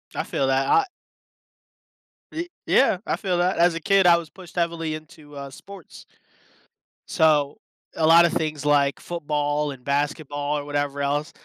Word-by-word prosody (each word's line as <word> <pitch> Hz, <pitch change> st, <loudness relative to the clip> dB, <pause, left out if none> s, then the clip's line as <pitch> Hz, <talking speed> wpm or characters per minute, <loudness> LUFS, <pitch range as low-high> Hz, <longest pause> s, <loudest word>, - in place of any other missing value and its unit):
I -, -, -1 dB
feel 135 Hz, -, -1 dB
that. 135 Hz, 0 st, +1 dB
I 410 Hz, -, +4 dB, 1.5 s
Ye 335 Hz, +2 st, -5 dB, 0.2 s
yeah. -, -, +3 dB
I -, -, 0 dB
feel 185 Hz, -4 st, -2 dB
that. 180 Hz, +2 st, +1 dB
As 175 Hz, 0 st, +4 dB
a -, -, -3 dB
kid, 195 Hz, +2 st, +3 dB
I 170 Hz, -1 st, +7 dB
was 170 Hz, -2 st, -7 dB
pushed 180 Hz, -1 st, -15 dB
heavily 170 Hz, -2 st, -1 dB
into, 155 Hz, -1 st, -13 dB
uh, 140 Hz, 0 st, -7 dB
sports 190 Hz, +5 st, -13 dB, 1.0 s
so, 150 Hz, -3 st, +2 dB, 0.4 s
a 160 Hz, -, +1 dB
lot 165 Hz, +2 st, +7 dB
of 170 Hz, -, 0 dB
things 155 Hz, -2 st, -2 dB
like 140 Hz, -1 st, +2 dB
football 150 Hz, -3 st, -2 dB
and 130 Hz, -2 st, -11 dB
basketball 145 Hz, +1 st, -2 dB
or 145 Hz, -, -8 dB
whatever 145 Hz, -1 st, -2 dB
else 145 Hz, +2 st, -1 dB
150 Hz, 165 wpm, -23 LUFS, 145-170 Hz, 1.5 s, I